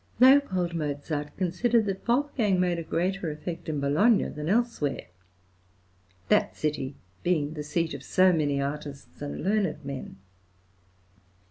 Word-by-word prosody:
L.. 265 +3 +8 0.3
Mozart 150 -1 -3
considered 215 +6 +2
that 195 +1 -4
Wolfgang 235 -6 +2
made 175 -2 +1
a - - -4
greater 180 +2 -1
effect 155 +2 -6
in 150 -2 -1
Bologna 160 +11 +3
than 150 +2 -5
elsewhere, 230 - 0 1.2
that - - +2
city 145 -3 -2 0.3
being 155 -4 0
the 150 - -5
seat 160 +2 -1
of 140 - -6
so 185 +6 +4
many 145 -4 +1
artists 140 0 -5
and 145 0 -5
learned 195 -7 0
men. 135 -8 -6
165 Hz, 130 wpm, -27 LUFS, 145-195 Hz, 1.2 s, L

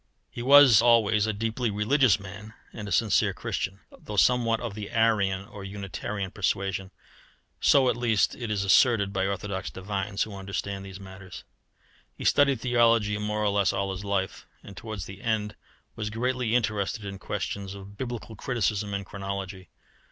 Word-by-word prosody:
He 120 - -6
was 135 -3 +8
always 110 -3 +4
a - - +1
deeply 115 +3 -2
religious 105 +2 +3
man 105 +3 -10 0.2
and 105 -2 -7
a - - -6
sincere 110 -3 +2
Christian, 95 +1 -4
though 105 - -8
somewhat 115 0 +3
of 115 -4 -5
the 105 -1 -6
Arian 100 -4 +1
or 100 -1 -10
Unitarian 100 0 -5
persuasion 95 -2 -2 0.7
so, 135 -2 +5
at 125 - +2
least, 115 -5 +2
it 120 -3 -6
is 100 -2 0
asserted 100 0 +4
by 95 0 0
orthodox 100 -1 -3
divines 100 +1 -3
who 105 -2 -8
understand 95 0 -4
these 95 0 -9
matters. 95 -1 -11 0.7
He - - -8
studied 140 -4 +3
theology 115 -4 +3
more 105 0 -2
or 105 - +2
less 100 -2 +2
all 95 0 -1
his 95 +1 -6
life, 100 -2 -2 0.2
and 100 - -11
towards 110 -5 -6
the 95 +1 -10
end 110 -3 -1 0.4
was 105 -1 -3
greatly 120 +1 -1
interested 110 -2 -1
in 100 -1 -6
questions 100 -1 -4
of 100 +1 -11
Biblical 120 -2 -6
criticism 105 -4 -1
and 100 0 -4
chronology. 95 -1 -6
105 Hz, 165 wpm, -27 LUFS, 100-115 Hz, 0.7 s, was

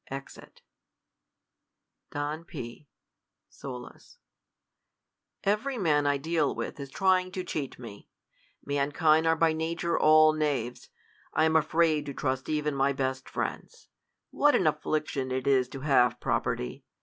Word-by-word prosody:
[Exit, 135 +1 -10 1.5
Don 145 +3 -4
P. 120 -2 -9 0.6
[Solus,'] 125 - -10 1.3
Every 215 +7 0
man 150 -7 +2
I 145 0 +2
deal 155 0 0
with - - -5
is 140 -1 -6
trying 185 +3 +2
to 185 - -3
cheat 150 -6 -4
me. 115 -5 -11 0.6
Mankind 155 +3 +2
are 160 - +4
by 160 0 +3
nature 165 +2 -1
all 155 0 +6
knaves. 135 -6 -2 0.5
I 155 - +4
am 160 0 +2
afraid 160 -1 +2
to 140 - -5
trust 130 -1 -2
even 150 -1 0
my 140 0 +1
best 130 -1 -3
friends. 475 -2 -5 0.4
What 295 0 +4
an 185 - +2
af 155 - +1
fliction 145 -4 -2
it 130 0 -2
is 130 -2 +3
to 135 - -8
have 130 -4 +3
property 60 - -2
150 Hz, 135 wpm, -28 LUFS, 135-160 Hz, 1.5 s, all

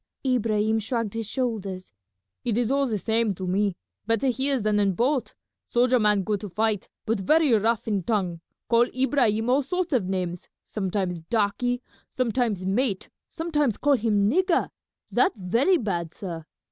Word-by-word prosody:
Ibrahim 220 -3 +1
shrugged 225 -1 -2
his 225 -2 -3
shoulders. 200 - -3 0.5
"It 230 -3 0
is 240 0 +1
all 275 0 +2
the 220 -3 -1
same 220 0 0
to 185 - -5
me; 195 +1 +1 0.3
better 230 +4 +2
here 265 +2 0
than 210 -1 +1
in 200 -2 +2
boat. 255 +6 0 0.3
Soldier 250 +1 +2
man 210 -2 +3
good 205 0 -1
to 205 - -6
fight, 215 +1 -1 0.2
but 220 -1 0
very 305 - +3
rough 225 +1 +1
in 205 -3 0
tongue; 180 -4 -1 0.3
call 235 0 +4
Ibrahim 245 -5 +2
all 260 +3 +3
sorts 345 +4 -2
of 235 -8 +2
names, 180 -2 -3 0.2
sometimes 190 -3 -2
Darkie, 230 +6 -1 0.3
sometimes 235 -6 -1
Mate, 200 0 0 0.2
sometimes 300 - 0
call 290 0 +3
him 210 -5 +2
Nigger, 370 - +2 0.4
that 400 - +3
very 230 - +2
bad, 175 - -3
sah. 170 -6 -6
225 Hz, 160 wpm, -25 LUFS, 200-255 Hz, 0.5 s, call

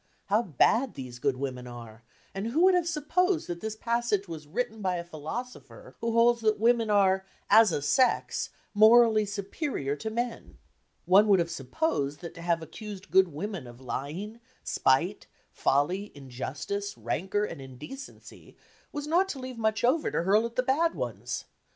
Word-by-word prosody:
How 210 +3 +4
bad 230 - +2
these 125 -2 -8
good 135 -1 0
women 125 -2 -4
are, 115 -2 -10 0.3
and 195 +3 -3
who 300 +9 +2
would 375 0 +6
have 355 -2 +2
supposed 340 +3 +1
that 175 -1 -5
this 220 0 -4
passage 230 -3 0
was 155 -3 -8
written 220 +5 -3
by 185 -2 0
a 170 - -3
philosopher 170 +10 -8
who 230 0 -1
holds 235 0 +4
that 215 -1 +2
women 230 0 +3
are, 190 -2 +3 0.3
"as 220 -1 +7
a 145 - -2
sex," 245 - +2 0.2
morally 220 0 +6
superior 200 - -3
to 220 - -4
men? 235 +1 -4 0.5
One 195 +4 +6
would 200 -2 +6
have 170 -1 0
supposed 140 - -2
that 170 -1 -7
to 170 - -10
have 170 -1 0
accused 205 +2 -9
good 190 0 +6
women 170 - -5
of 120 0 -12
lying, 155 - -5 0.2
spite, 170 +10 +1 0.2
folly, 180 +9 0
injustice, 145 +10 -5
rancour 190 +4 -1
and 140 - -7
indecency 135 - -11 0.3
was 290 0 -4
not 350 +5 +2
to 280 - -4
leave 255 -2 -7
much 220 0 0
over 270 +6 +2
to - - -1
hurl 210 +5 +3
at 235 - -15
the 255 - +1
bad 310 +6 +2
ones. - - -4
205 Hz, 170 wpm, -28 LUFS, 160-235 Hz, 0.5 s, as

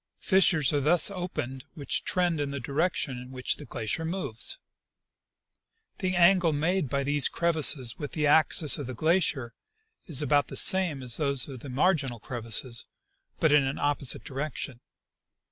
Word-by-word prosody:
Fissures 175 -7 +3
are 145 - +1
thus 170 +7 +4
opened 155 -9 -6
which 145 -3 -3
trend 175 -3 0
in 145 -1 -2
the 140 0 -5
direction 140 -1 -2
in 125 0 -11
which 130 -1 -2
the 150 - -9
glacier 115 +7 -3
moves. 160 - -4 1.4
The 185 -2 -2
angle 175 -2 +4
made 160 +1 -1
by 140 +1 -1
these 145 0 +2
crevasses 155 -7 +1
with 145 - -6
the 150 -2 -1
axis 155 0 +4
of 140 - -6
the 130 - -7
glacier 155 -5 0 0.5
is 150 -4 +1
about 145 -2 +2
the - - -9
same 175 -8 +3
as 125 -2 -1
those 140 -4 0
of 135 -3 -9
the 140 - -10
marginal 135 -3 0
crevasses, 115 +1 -1 0.5
but 160 - +2
in 145 -1 +5
an 135 +1 -3
opposite 145 -2 0
direction. 135 -2 -5
145 Hz, 160 wpm, -27 LUFS, 130-165 Hz, 1.4 s, in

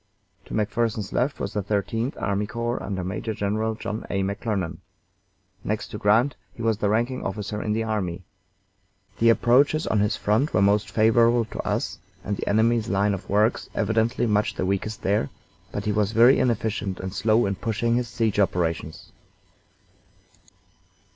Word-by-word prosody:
To - - -6
McPherson's 110 -1 -1
left 135 +4 0
was - - -3
the 105 - 0
Thirteenth 110 +5 -2
Army 100 +1 -1
Corps, 115 +2 -3
under 95 -3 -3
Major 100 +4 -3
General 110 +3 -1
John 110 0 -5
A. 95 -1 0
McClernand. 100 -2 -2 0.9
Next 110 0 -2
to 105 - -6
Grant 115 +7 +3 0.2
he 115 - -7
was 110 -2 +1
the 105 - +1
ranking 120 +4 0
officer 105 +1 -4
in 105 - -1
the 115 +1 0
army. 95 -5 -2 1.0
The 115 - +5
approaches 135 +7 +4
on 110 - +1
his 105 0 +1
front 110 +9 +1
were 90 - +4
most 100 +1 +2
favorable 115 +1 +4
to 110 - -9
us, - - -2 0.2
and 100 - -2
the - - -5
enemy's 110 +1 +2
line 100 +2 +2
of 95 - -6
works 105 +3 +1
evidently 115 +2 +1
much 105 -2 +1
the - - -1
weakest 100 +3 -2
there, 95 -7 +1 0.4
but - - -4
he 105 - +1
was 105 0 0
very 120 +4 +6
inefficient 110 -5 -1
and 95 0 -5
slow 110 +3 +2
in 100 - 0
pushing 115 +3 -1
his 120 0 0
siege 110 -3 -1
operations. 85 -5 -1
105 Hz, 165 wpm, -24 LUFS, 100-115 Hz, 1.0 s, very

